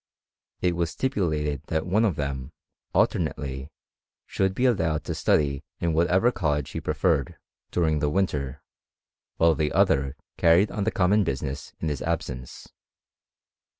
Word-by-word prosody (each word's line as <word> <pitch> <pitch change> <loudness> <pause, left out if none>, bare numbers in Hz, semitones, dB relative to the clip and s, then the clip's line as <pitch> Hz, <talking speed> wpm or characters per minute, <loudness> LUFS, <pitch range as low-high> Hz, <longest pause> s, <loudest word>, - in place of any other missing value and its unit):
It 90 -1 +1
was 85 -1 0
stipulated 75 - -1
that 80 -1 -1
one 105 +5 +2
of 95 -7 +1
them, 70 -2 -4 0.4
alternately, 65 -1 0 0.6
should 95 0 0
be 125 - +1
allowed 80 - +1
to - - -3
study 70 -3 +1 0.2
in 85 -1 0
whatever 90 +8 +3
college 75 - -1
he - - -4
preferred, 70 - 0 0.3
during 80 -3 +1
the 75 0 +1
winter, 75 -6 -1 0.7
while 80 0 +5
the 75 -2 0
other 70 +1 +2 0.2
carried 85 +5 +4
on 100 - -2
the 110 - +1
common 100 +1 +3
business 70 -3 -4
in 80 - -2
his 75 -3 -3
absence. 65 -7 -4
80 Hz, 140 wpm, -26 LUFS, 70-90 Hz, 0.7 s, while